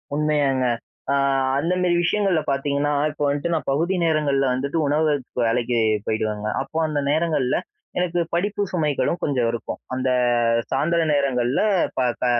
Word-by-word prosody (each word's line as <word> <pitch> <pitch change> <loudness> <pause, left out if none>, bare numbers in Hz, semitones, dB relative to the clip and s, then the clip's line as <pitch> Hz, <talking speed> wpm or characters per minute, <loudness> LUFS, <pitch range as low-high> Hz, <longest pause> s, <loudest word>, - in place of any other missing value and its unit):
உண்மையாங்க. 145 -3 +1 0.5
ஆ - - +3 0.4
அந்தமேரி 175 +3 +1
விஷயங்கள்ல 190 -2 +1
பார்த்தீங்கன்னா, 140 +1 0 0.2
இப்போ 145 0 -5
வந்துட்டு, 145 +4 -1
நான் 160 - -2
பகுதி 165 +7 +1
நேரங்கள்ல 145 -4 +1
வந்துட்டு, 140 +5 -2
உணவகத்துக்கு 145 -4 0
வேலைக்கி 120 +1 0 0.3
போயிடுவேங்க. 110 -1 -2
அப்போ 160 - -6
அந்த 150 -1 -1
நேரங்கள்ல 155 -5 +1 0.4
எனக்கு 175 -1 0
படிப்பு 200 +4 0
சுமைகளும் 160 0 0
கொஞ்சம் 130 -5 +1
இருக்கும். 115 - -5
அந்த 130 0 -1 0.6
சாய்ந்திர 165 +5 +1
நேரங்கள்ல 130 -3 +1 0.4
ப - - +1 0.2
க - - +1
145 Hz, 130 wpm, -22 LUFS, 130-165 Hz, 0.6 s, ஆ